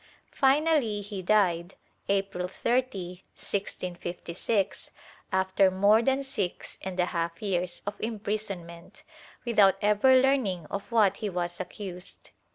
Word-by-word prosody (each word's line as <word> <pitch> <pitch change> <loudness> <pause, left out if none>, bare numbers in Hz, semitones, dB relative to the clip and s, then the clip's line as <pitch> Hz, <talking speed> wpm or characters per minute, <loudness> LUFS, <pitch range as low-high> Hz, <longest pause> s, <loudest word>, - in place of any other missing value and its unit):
Finally 275 -6 +3
he 200 -1 -6
died, 180 -3 +2 0.3
April 195 -2 0
30, 195 -4 -2
1656, 185 +1 -2 0.4
after 190 0 +3
more 200 +4 +4
than 270 +3 +1
six 205 -10 -3
and 185 -1 -5
a 180 - +4
half 170 -1 -3
years 180 -4 -2
of 205 - -2
imprisonment, 200 -6 -4 0.4
without 210 -5 +5
ever 210 +6 +4
learning 250 - +1
of 200 +3 -5
what 210 -4 +4
he 215 - -3
was 175 -1 -3
accused. 185 0 -7
195 Hz, 115 wpm, -28 LUFS, 180-215 Hz, 0.4 s, without